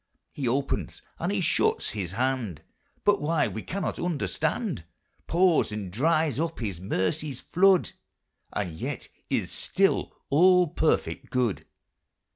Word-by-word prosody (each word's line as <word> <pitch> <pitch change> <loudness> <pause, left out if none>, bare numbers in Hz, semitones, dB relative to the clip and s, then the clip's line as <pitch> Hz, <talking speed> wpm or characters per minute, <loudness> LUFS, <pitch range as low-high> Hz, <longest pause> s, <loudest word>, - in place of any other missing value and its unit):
He 135 -4 -3
opens 135 +3 -1 0.2
and - - -1
he - - 0
shuts - - +2
his 95 -4 -3
hand, 115 - -1 0.4
But 205 -1 +3
why 150 0 +2
we 110 - -5
cannot 195 - -3
understand: 165 - -1 0.4
Pours 175 -7 +3
and 105 -4 -5
dries 155 - +2
up 165 0 -1
his 100 -8 -4
mercies' 100 - -1
flood, 190 0 +3 0.6
And 95 -5 -3
yet 80 - -5 0.2
is - - -1
still - - +1 0.2
All 180 +3 +6
perfect 145 -4 0
Good. 125 -6 0
140 Hz, 125 wpm, -27 LUFS, 105-165 Hz, 0.6 s, All